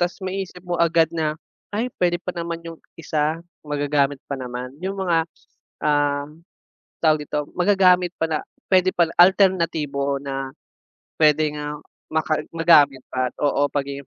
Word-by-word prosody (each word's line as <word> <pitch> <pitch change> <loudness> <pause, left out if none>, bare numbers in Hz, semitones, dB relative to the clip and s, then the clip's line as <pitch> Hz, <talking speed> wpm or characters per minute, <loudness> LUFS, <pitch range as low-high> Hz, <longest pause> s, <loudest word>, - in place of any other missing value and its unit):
tapos 175 +2 -2
maisip 185 -1 -5
mo 175 -1 -2
agad 165 -1 +3
na 155 -2 -1 0.4
ay 235 +4 -1
puwede 175 -1 +1
pa - - -3
naman 170 -1 -5
yung 165 -1 -9 0.2
isa 155 0 -2 0.2
magagamit 145 -1 0
pa 140 - -2
naman. 125 0 -6
Yung 190 +2 -3
mga, 165 -3 +1 0.6
ah, 145 -1 +2 0.8
tawag 155 -2 +2
dito, 150 0 -3
magagamit 180 -2 +4
pa - - +4
na 155 -1 0 0.3
puwede 185 -1 +4
pala 170 -1 +1
alternatibo 165 -7 +3
na 135 -1 -4 0.7
puwede 155 0 +4
nga 150 0 -4 0.3
maka 155 0 0
magamit 150 -5 +5
pa, 130 0 0
oo, 145 0 +2
pagiging 140 -1 -3
160 Hz, 140 wpm, -22 LUFS, 145-175 Hz, 0.8 s, magamit